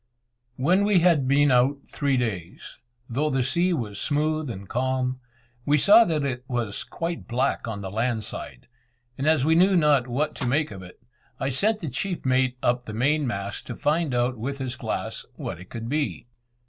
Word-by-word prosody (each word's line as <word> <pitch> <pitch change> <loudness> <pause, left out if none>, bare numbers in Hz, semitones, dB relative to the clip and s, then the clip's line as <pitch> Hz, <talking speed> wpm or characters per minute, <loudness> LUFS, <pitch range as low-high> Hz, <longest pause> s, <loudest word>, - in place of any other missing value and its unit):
When 175 +11 +2
we 200 -4 +4
had 165 -7 +3
been 145 +1 +4
out 130 +3 +3
three 140 -2 0
days, 100 -9 -4 0.3
though 145 +6 0
the 135 -2 +1
sea 170 +8 +2
was 110 - -3
smooth 155 0 0
and 100 -3 -7
calm, 130 +1 -1 0.4
we 145 +3 +3
saw 210 +9 +7
that 155 -6 0
it 125 -2 -3
was 120 -6 -2
quite 170 0 -5
black 125 0 0
on 105 -3 -4
the 95 -1 -6
land 115 +1 -1
side; 60 - -7 0.5
and 135 +4 -2
as 155 -4 +3
we 160 - +4
knew 185 +4 +5
not 150 -6 +3
what 135 +5 -1
to 130 - -2
make 145 +2 +1
of 95 -2 -8
it, 95 +5 -14 0.4
I 135 - -1
sent 210 - +1
the 165 - -4
chief 170 +7 -3
mate 130 -1 +2
up 125 0 +1
the 110 - -7
main 145 +5 +1
mast 100 -3 -4
to - - -5
find 150 -2 0
out 120 0 0
with 140 +5 -3
his 130 -2 -4
glass - - -4
what - - -6
it 90 - -12
could 115 -1 -6
be. 145 0 -2
130 Hz, 195 wpm, -25 LUFS, 120-155 Hz, 0.5 s, saw